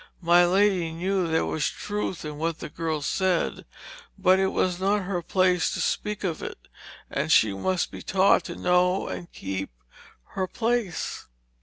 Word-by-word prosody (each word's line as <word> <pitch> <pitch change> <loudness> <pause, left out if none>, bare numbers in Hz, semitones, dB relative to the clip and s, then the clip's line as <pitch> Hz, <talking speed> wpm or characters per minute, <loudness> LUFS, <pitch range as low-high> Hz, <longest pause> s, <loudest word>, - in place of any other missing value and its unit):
My 175 +1 +6
lady 190 -3 +2
knew 185 +2 -1
there 160 0 +1
was 155 - -1
truth 205 -5 -4
in 150 -1 -6
what 165 0 -1
the - - -7
girl 160 -2 -3
said, 185 +2 0 0.5
but 190 -1 +4
it 190 - +3
was 185 -1 0
not 200 +1 +1
her 180 -2 -2
place 180 0 +2
to - - -4
speak 210 -1 -2
of 170 -4 -2
it, - - -6 0.5
and - - -1
she 105 -3 +5
must 180 - -1
be - - -8
taught 190 +1 +3
to 170 - -6
know 180 +1 +2
and 175 - -6
keep 95 0 -4 0.6
her 190 -1 -2
place. 230 -3 -2
180 Hz, 165 wpm, -26 LUFS, 165-190 Hz, 0.6 s, My